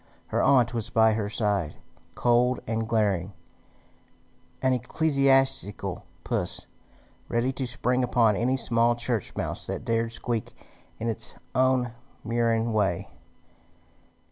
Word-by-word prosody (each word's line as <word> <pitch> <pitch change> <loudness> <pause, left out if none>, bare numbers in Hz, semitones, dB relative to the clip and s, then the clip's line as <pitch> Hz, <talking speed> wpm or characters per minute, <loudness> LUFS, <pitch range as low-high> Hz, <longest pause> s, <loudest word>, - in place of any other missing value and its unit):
Her - - +1
aunt 125 -3 +4
was 115 -3 -3
by 110 0 +4
her 105 -2 -2
side, 105 -7 -1 0.4
cold 125 +1 +2
and 110 0 -2
glaring, 100 -4 +1 1.3
an 130 0 +2
ecclesiastical 135 -3 +1 0.2
puss, - - -2 0.6
ready 120 +3 +1
to 130 -1 -3
spring 125 +1 0
upon 115 -4 +3
any 125 +5 +1
small 120 -1 +3
church 115 -3 -2
mouse - - -3
that - - -4
dared 115 -1 0
squeak 115 -1 -3 0.4
in 115 - -4
its 115 - -1 0.2
own 130 -1 +2 0.3
murine 115 -1 +1
way. 100 -5 0
115 Hz, 115 wpm, -26 LUFS, 110-125 Hz, 1.3 s, aunt